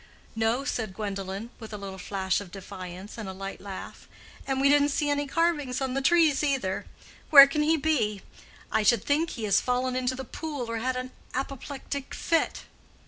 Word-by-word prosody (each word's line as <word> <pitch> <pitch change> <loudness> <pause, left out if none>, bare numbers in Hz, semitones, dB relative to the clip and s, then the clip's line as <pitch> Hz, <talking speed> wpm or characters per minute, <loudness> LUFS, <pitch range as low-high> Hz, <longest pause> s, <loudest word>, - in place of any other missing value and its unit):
"No," 225 +4 +1
said 220 -8 -3
Gwendolen, 200 +1 -4
with 220 -2 -9
a - - -4
little 195 -1 -7
flash 190 0 -1
of 200 - -9
defiance, 185 +2 -8
and 210 -3 -5
a - - -5
light 195 +1 -7
laugh. 195 -1 -8 0.4
"And 270 -1 0
we 275 - +4
didn't 290 0 +5
see 290 0 0
any 290 0 0
carvings 295 -5 +1
on 265 -2 -2
the 275 - 0
trees, 315 -1 +4
either. 260 -10 -1 0.4
Where 280 -3 +12
can 280 +2 -1
he 315 +2 +3
be? 235 -10 0 0.5
I - - +3
should 215 0 +4
think 310 +3 +2
he 230 - -6
has 205 -2 +3
fallen 250 0 0
into 255 0 0
the 265 0 -6
pool 285 -5 -5
or 230 - -2
had 255 +3 -1
an 255 0 -4 0.2
apoplectic 275 +1 -5
fit." 330 -1 0
255 Hz, 190 wpm, -27 LUFS, 205-285 Hz, 0.5 s, Where